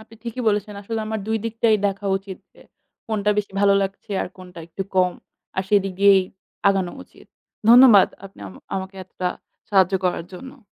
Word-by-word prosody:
আপনি 225 Hz, -, -17 dB
ঠিকই 235 Hz, +2 st, -5 dB
বলেছেন। 210 Hz, 0 st, -1 dB
আসলে 225 Hz, +2 st, -4 dB
আমার 220 Hz, 0 st, -3 dB
২ 220 Hz, 0 st, 0 dB
দিকটাই 225 Hz, -1 st, +2 dB
দেখা 200 Hz, +1 st, -3 dB
উচিত। 195 Hz, -1 st, -9 dB, 0.2 s
এ -, -, -15 dB, 0.5 s
কোনটা 210 Hz, -1 st, 0 dB
বেশি 205 Hz, -2 st, -3 dB
ভালো 200 Hz, -1 st, +4 dB
লাগছে 195 Hz, +2 st, -6 dB
আর -, -, -5 dB
কোনটা 180 Hz, -2 st, -13 dB
একটু 180 Hz, +3 st, -5 dB
কম। 180 Hz, -1 st, +3 dB, 0.4 s
আর 190 Hz, -, +1 dB
সেদিকেই 195 Hz, -1 st, +4 dB, 0.5 s
আগানো 190 Hz, -3 st, 0 dB
উচিত। -, -, -20 dB, 0.4 s
ধন্যবাদ 240 Hz, -5 st, +8 dB, 0.2 s
আপনি 195 Hz, -, -13 dB
আম 95 Hz, -, -11 dB, 0.2 s
আমাকে 190 Hz, 0 st, -5 dB
এতটা 180 Hz, -1 st, -4 dB, 0.4 s
সাহায্য 190 Hz, -1 st, +3 dB
করার 175 Hz, -2 st, -1 dB
জন্য। 265 Hz, +6 st, -11 dB
200 Hz, 165 wpm, -22 LUFS, 190-220 Hz, 0.5 s, ধন্যবাদ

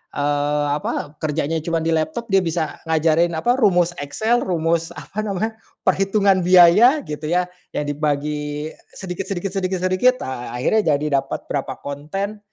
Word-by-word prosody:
eee, 145 Hz, 0 st, 0 dB
apa, 150 Hz, 0 st, -4 dB
kerjanya 155 Hz, +1 st, -1 dB
cuman 165 Hz, +1 st, -2 dB
di 165 Hz, -, 0 dB
laptop, 165 Hz, +9 st, -1 dB
dia 195 Hz, -, +5 dB
bisa 165 Hz, -3 st, -2 dB
ngajarin, 160 Hz, +1 st, +2 dB
apa, 160 Hz, +10 st, +1 dB
rumus 180 Hz, -6 st, +3 dB
Excel, 220 Hz, +12 st, 0 dB
rumus 165 Hz, -1 st, 0 dB
apa 210 Hz, -, -8 dB
namanya, 215 Hz, +2 st, -2 dB, 0.3 s
perhitungan 195 Hz, +1 st, +3 dB
biaya, 185 Hz, -, +6 dB
gitu 150 Hz, -, -6 dB
ya, 180 Hz, +2 st, +1 dB, 0.3 s
yang -, -, 0 dB
dibagi 150 Hz, +1 st, -2 dB, 0.2 s
sedikit 185 Hz, 0 st, -5 dB
sedikit 195 Hz, 0 st, -3 dB
sedikit 190 Hz, -1 st, -2 dB
sedikit, 185 Hz, +8 st, +3 dB
ah, 125 Hz, -2 st, -5 dB
akhirnya 155 Hz, -, +2 dB
jadi 140 Hz, -1 st, +1 dB
dapat 135 Hz, -, -7 dB
berapa 140 Hz, -, -2 dB
konten, 195 Hz, +9 st, -4 dB
165 Hz, 150 wpm, -21 LUFS, 150-195 Hz, 0.3 s, biaya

